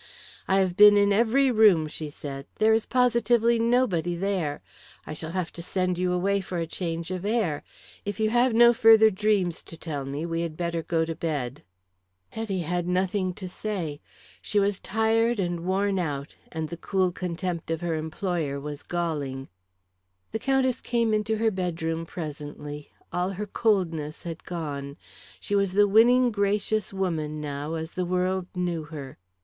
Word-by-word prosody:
"I 190 - +3
have 185 -2 0
been 205 +1 +8
in 200 0 +4
every 240 +5 +3
room," 210 -8 +5
she 155 0 -6
said. 140 -1 -7
"There 220 +1 +4
is 220 0 +1
positively 235 -1 +3
nobody 225 -8 +2
there. 175 -5 -2 0.4
I - - -6
shall 160 +1 -6
have 180 0 -3
to 170 - -7
send 180 0 -1
you 180 0 +1
away 195 +3 +1
for 185 -1 -5
a 165 - -1
change 165 0 -4
of 185 -1 -3
air. 205 -9 0 0.4
If 205 0 -4
you 215 0 +2
have 245 +2 +4
no 235 +1 +7
further 220 -1 +7
dreams 195 -4 +1
to 165 - -12
tell 150 -5 -4
me 140 +4 -4
we 165 0 -2
had 165 -2 -4
better 170 -1 -1
go 165 0 0
to 165 - -3
bed." 145 -5 -3 0.7
Hetty 205 -5 -3
had 175 +1 -2
nothing 185 +1 0
to 190 - -6
say. 180 -6 -4 0.4
She 210 - +1
was 200 -1 +1
tired 225 +1 +1
and 175 -2 -1
worn 190 +2 0
out, 145 -4 -3 0.2
and 160 -1 -3
the 170 - -6
cool 185 +1 0
contempt 175 -1 -4
of 165 0 -2
her 170 -1 -1
employer 160 -2 -2
was 145 0 -6
galling. 145 -6 -3 0.8
The 220 - -2
Countess 260 -1 +1
came 230 -2 +1
into 215 +1 0
her 225 0 +2
bedroom 165 -3 -2
presently; 150 -2 -7 0.2
all 180 +1 0
her 195 +2 -4
coldness 175 -8 0
had 165 -2 -7
gone. 145 -4 -5 0.4
She - - -5
was 200 -2 +2
the 205 +1 +5
winning, 240 +4 +5
gracious 205 0 0
woman 160 -6 -2
now 145 +1 -4
as 160 0 -5
the 185 - -2
world 185 +1 0
knew 175 -3 -2
her. 145 - -9
180 Hz, 170 wpm, -26 LUFS, 160-210 Hz, 0.8 s, been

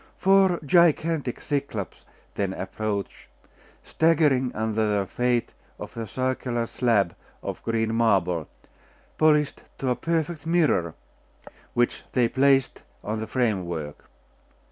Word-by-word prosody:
Four 195 -2 +4
gigantic 160 -3 +2
Cyclops 140 - -4 0.3
then 100 -2 -2
approached, 100 +1 -4 0.6
staggering 150 -6 +2
under 110 0 -1
the 105 -2 +1
weight 125 -1 0 0.2
of - - -9
a 115 -1 -5
circular 130 0 -2
slab 110 -7 +1 0.3
of - - -5
green 115 -1 -1
marble, 95 -8 +1 0.7
polished 150 -2 +3 0.2
to 130 - -2
a - - +1
perfect 165 0 -2
mirror, 155 - +2 0.8
which 120 0 +1
they 125 -2 +3
placed 135 +1 +2 0.2
on 110 +1 -3
the 110 - -4
framework. 90 - -2
120 Hz, 110 wpm, -25 LUFS, 105-150 Hz, 0.8 s, Four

